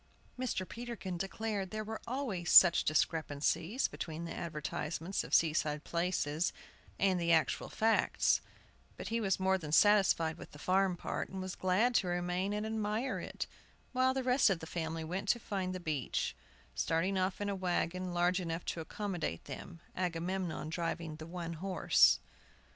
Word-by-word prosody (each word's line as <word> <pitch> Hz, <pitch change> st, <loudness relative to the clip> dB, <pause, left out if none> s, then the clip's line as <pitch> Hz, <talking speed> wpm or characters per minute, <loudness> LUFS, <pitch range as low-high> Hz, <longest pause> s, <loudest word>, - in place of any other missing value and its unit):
Mr. 250 Hz, -7 st, -2 dB
Peterkin 230 Hz, -6 st, -5 dB
declared 195 Hz, +2 st, -3 dB
there 215 Hz, +3 st, -4 dB
were 220 Hz, +1 st, -6 dB
always 230 Hz, -9 st, -2 dB
such 175 Hz, -2 st, +8 dB
discrepancies 160 Hz, -, +1 dB
between 165 Hz, +1 st, -6 dB
the 165 Hz, -, -5 dB
advertisements 160 Hz, +2 st, -3 dB
of -, -, -10 dB
seaside 150 Hz, -2 st, +2 dB
places 170 Hz, -2 st, 0 dB, 0.5 s
and 190 Hz, -2 st, +2 dB
the 170 Hz, 0 st, +2 dB
actual 160 Hz, -1 st, +2 dB
facts; 225 Hz, 0 st, +2 dB, 0.6 s
but -, -, -6 dB
he 230 Hz, +1 st, 0 dB
was 195 Hz, -3 st, +1 dB
more 190 Hz, 0 st, +2 dB
than 150 Hz, -4 st, -6 dB
satisfied 170 Hz, -4 st, +4 dB
with -, -, -11 dB
the -, -, -10 dB
farm 185 Hz, +3 st, +2 dB
part, -, -, -3 dB
and 190 Hz, -, -6 dB
was 185 Hz, -1 st, -4 dB
glad 190 Hz, +7 st, +2 dB
to 195 Hz, -, +2 dB
remain 180 Hz, +2 st, -1 dB
and 210 Hz, +1 st, -2 dB
admire 220 Hz, +3 st, -1 dB
it, -, -, -4 dB, 0.5 s
while 260 Hz, 0 st, +2 dB
the 265 Hz, -, 0 dB
rest 250 Hz, -2 st, +4 dB
of 190 Hz, -, +2 dB
the 160 Hz, -, -7 dB
family 160 Hz, -1 st, -3 dB
went 185 Hz, +5 st, -3 dB
to 240 Hz, -, +3 dB
find 190 Hz, -4 st, -3 dB
the 185 Hz, -, -4 dB
beach, 155 Hz, -7 st, -2 dB, 0.4 s
starting 165 Hz, -, 0 dB
off 185 Hz, 0 st, 0 dB
in 205 Hz, -, -2 dB
a 200 Hz, -, 0 dB
wagon 185 Hz, -1 st, -1 dB
large 175 Hz, +2 st, +2 dB
enough 165 Hz, -1 st, -4 dB
to 165 Hz, -, -3 dB
accommodate 175 Hz, -, -4 dB
them, 165 Hz, -, -8 dB
Agamemnon 175 Hz, -2 st, -2 dB
driving 165 Hz, -1 st, -3 dB
the 160 Hz, 0 st, -8 dB
one 170 Hz, -1 st, -5 dB
horse. 185 Hz, +2 st, +4 dB
180 Hz, 165 wpm, -33 LUFS, 165-200 Hz, 0.6 s, such